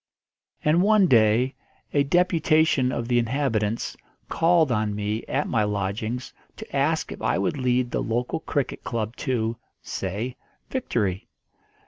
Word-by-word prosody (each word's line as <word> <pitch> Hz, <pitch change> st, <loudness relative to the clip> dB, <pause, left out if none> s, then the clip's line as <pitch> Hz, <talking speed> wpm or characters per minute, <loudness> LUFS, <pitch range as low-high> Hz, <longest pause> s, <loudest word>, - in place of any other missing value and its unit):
And 155 Hz, +3 st, +4 dB
one 210 Hz, 0 st, +5 dB
day 120 Hz, -1 st, +4 dB, 0.4 s
a 145 Hz, -, +4 dB
deputation 160 Hz, -4 st, +3 dB
of 120 Hz, -2 st, -3 dB
the 120 Hz, -1 st, +3 dB
inhabitants 115 Hz, -3 st, -1 dB, 0.3 s
called 165 Hz, -4 st, +3 dB
on 105 Hz, -2 st, 0 dB
me 105 Hz, +2 st, -2 dB
at 140 Hz, +2 st, -1 dB
my 110 Hz, -3 st, +1 dB
lodgings 105 Hz, +4 st, -3 dB, 0.2 s
to -, -, -9 dB
ask -, -, +1 dB
if -, -, -8 dB
I -, -, +1 dB
would 100 Hz, +9 st, -1 dB
lead 125 Hz, -1 st, +1 dB
the -, -, -1 dB
local 120 Hz, +6 st, -1 dB
cricket 145 Hz, -4 st, -3 dB
club 115 Hz, 0 st, -3 dB
to, 115 Hz, -4 st, -1 dB, 0.3 s
say, 105 Hz, +7 st, -4 dB, 0.3 s
victory. 105 Hz, -, -1 dB
120 Hz, 135 wpm, -25 LUFS, 110-145 Hz, 0.4 s, one